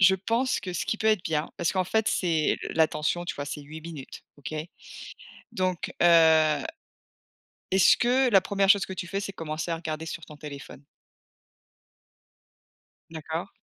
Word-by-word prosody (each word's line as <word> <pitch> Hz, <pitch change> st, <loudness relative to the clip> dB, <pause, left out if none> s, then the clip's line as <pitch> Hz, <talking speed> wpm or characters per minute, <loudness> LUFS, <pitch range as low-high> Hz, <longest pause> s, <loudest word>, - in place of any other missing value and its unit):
je 190 Hz, 0 st, +7 dB
pense 230 Hz, +7 st, 0 dB
que 185 Hz, -1 st, -6 dB
ce 175 Hz, -, -2 dB
qui -, -, -1 dB
peut 220 Hz, -, -1 dB
être 215 Hz, -4 st, +3 dB
bien 155 Hz, -1 st, -1 dB
parce 170 Hz, -, 0 dB
qu'en 185 Hz, -1 st, 0 dB
fait 220 Hz, +3 st, +1 dB
c'est 165 Hz, -4 st, +1 dB
le -, -, -5 dB
l'attention, 160 Hz, +2 st, +1 dB
tu 175 Hz, -, -4 dB
vois, 145 Hz, -, -4 dB
c'est 145 Hz, +1 st, -6 dB
8 155 Hz, +2 st, -10 dB
minutes. 155 Hz, -5 st, -9 dB
OK? 145 Hz, +1 st, -8 dB, 1.0 s
Donc 185 Hz, -5 st, -2 dB
heu, 160 Hz, -2 st, +5 dB, 1.1 s
est-ce 190 Hz, -1 st, +5 dB
que 250 Hz, +2 st, +3 dB
la 195 Hz, -4 st, +6 dB
1re 195 Hz, 0 st, +1 dB
chose 200 Hz, -2 st, +5 dB
que 190 Hz, -, -6 dB
tu 185 Hz, -1 st, -5 dB
fais 195 Hz, +3 st, -3 dB
c'est 195 Hz, -, -5 dB
commencer 160 Hz, 0 st, -4 dB
à 165 Hz, -, 0 dB
regarder 160 Hz, -1 st, -5 dB
sur 165 Hz, 0 st, -6 dB
ton 150 Hz, -, -13 dB
téléphone? 140 Hz, -1 st, -10 dB, 2.3 s
D'accord. 160 Hz, +3 st, -5 dB
170 Hz, 165 wpm, -27 LUFS, 155-195 Hz, 2.3 s, je